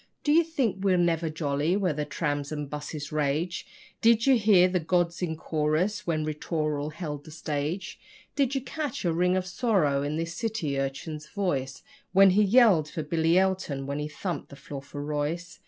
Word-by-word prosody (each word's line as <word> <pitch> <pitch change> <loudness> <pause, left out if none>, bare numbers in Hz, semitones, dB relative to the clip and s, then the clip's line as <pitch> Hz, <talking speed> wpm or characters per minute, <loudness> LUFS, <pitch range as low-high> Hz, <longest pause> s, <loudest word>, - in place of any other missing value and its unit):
Do 295 - +2
you 330 +3 +6
think 270 - -1
we're 190 -2 +3
never 170 -2 +1
jolly 155 +2 0
where 185 -5 +1
the 150 0 -2
trams 145 -2 -2
and 150 -1 -3
buses 150 +1 -6
rage? 155 +4 -1 0.3
Did 230 0 +4
you 270 -1 +6
hear 205 -5 +5
the 180 0 0
gods 170 +1 0
in 165 -3 -1
chorus 160 +8 -1
when 155 -2 0
'Ri 155 - -1
tooral' 150 -1 -2
held 150 -4 -5
the - - -13
stage? 155 +3 -4 0.4
Did 275 -1 +1
you 270 - 0
catch 280 -3 -4
a 170 - +2
ring 180 +2 +2
of 185 - -1
sorrow 175 - +1
in 145 +2 -2
the 165 - -1
city 165 -5 -2
urchin's 150 +3 -4
voice 140 -10 -2 0.3
When 195 0 +7
he 200 +3 +4
yelled 205 -7 +5
for 160 - -4
Billy 165 +2 +2
Elton, 185 -8 0
when 140 +1 -3
he 150 - -2
thumped 160 +1 -5
the 140 - -11
floor 140 0 -8
for 145 +1 -7
Royce? 150 +4 -3
165 Hz, 190 wpm, -27 LUFS, 150-190 Hz, 0.4 s, When